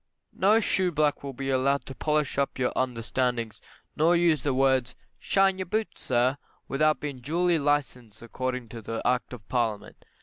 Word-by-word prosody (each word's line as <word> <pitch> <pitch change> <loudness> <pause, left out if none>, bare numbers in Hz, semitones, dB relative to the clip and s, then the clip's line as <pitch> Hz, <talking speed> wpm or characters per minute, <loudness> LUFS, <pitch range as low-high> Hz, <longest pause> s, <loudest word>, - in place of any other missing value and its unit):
No 210 +4 +4
shoeblack 170 -8 +1
will 140 -1 -6
be 135 +1 -3
allowed 135 +2 +1
to 135 - -8
polish 150 0 0
up 140 - -1
your 130 -1 0
understandings, 120 -2 -1 0.3
nor 165 +3 +4
use 170 -4 +3
the 145 - 0
words, 130 -1 +2 0.2
"shine 195 -1 +2
your 185 - -3
boots, 215 +4 -3
sir," 130 +3 +1 0.3
without 155 +2 +2
being 145 -3 -5
duly 170 +6 +1
licensed 130 -7 -1
according 125 0 -4
to 115 -1 -5
Act 125 0 0
of 115 -6 -10
Parliament. 115 -5 -2
135 Hz, 160 wpm, -27 LUFS, 125-155 Hz, 0.3 s, No